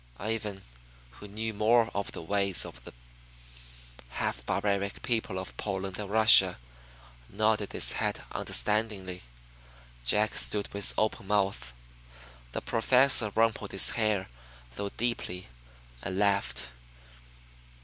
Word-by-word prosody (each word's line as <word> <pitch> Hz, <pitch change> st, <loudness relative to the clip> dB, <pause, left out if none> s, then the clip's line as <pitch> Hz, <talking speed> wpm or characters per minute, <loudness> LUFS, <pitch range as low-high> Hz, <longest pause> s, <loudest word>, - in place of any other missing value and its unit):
Ivan, 105 Hz, -1 st, -4 dB, 0.5 s
who 105 Hz, -, -12 dB
knew 110 Hz, +2 st, -4 dB
more 110 Hz, +2 st, +2 dB
of 100 Hz, 0 st, -3 dB
the -, -, -7 dB
ways 100 Hz, +1 st, +2 dB
of -, -, -11 dB
the -, -, -9 dB, 1.2 s
half 65 Hz, 0 st, -3 dB
barbaric 100 Hz, -1 st, -2 dB
people 110 Hz, -5 st, -1 dB
of 95 Hz, -, -6 dB
Poland 95 Hz, -2 st, -4 dB
and 105 Hz, -2 st, -4 dB
Russia, 105 Hz, -4 st, +7 dB, 0.7 s
nodded 105 Hz, 0 st, 0 dB
his -, -, +4 dB
head -, -, -2 dB
understandingly. 105 Hz, -4 st, -1 dB, 0.8 s
Jack 105 Hz, -, +1 dB
stood 105 Hz, -1 st, 0 dB
with 100 Hz, 0 st, +3 dB
open 110 Hz, -1 st, -1 dB
mouth. 95 Hz, -12 st, -1 dB, 0.8 s
The -, -, -3 dB
Professor 125 Hz, 0 st, +3 dB
rumpled 110 Hz, -2 st, 0 dB
his 95 Hz, -, +6 dB
hair, 110 Hz, -4 st, 0 dB, 0.5 s
though 100 Hz, +9 st, -4 dB
deeply, 105 Hz, -, -4 dB, 0.5 s
and 95 Hz, -, -5 dB
laughed. 100 Hz, 0 st, 0 dB
100 Hz, 115 wpm, -28 LUFS, 95-110 Hz, 1.2 s, Russia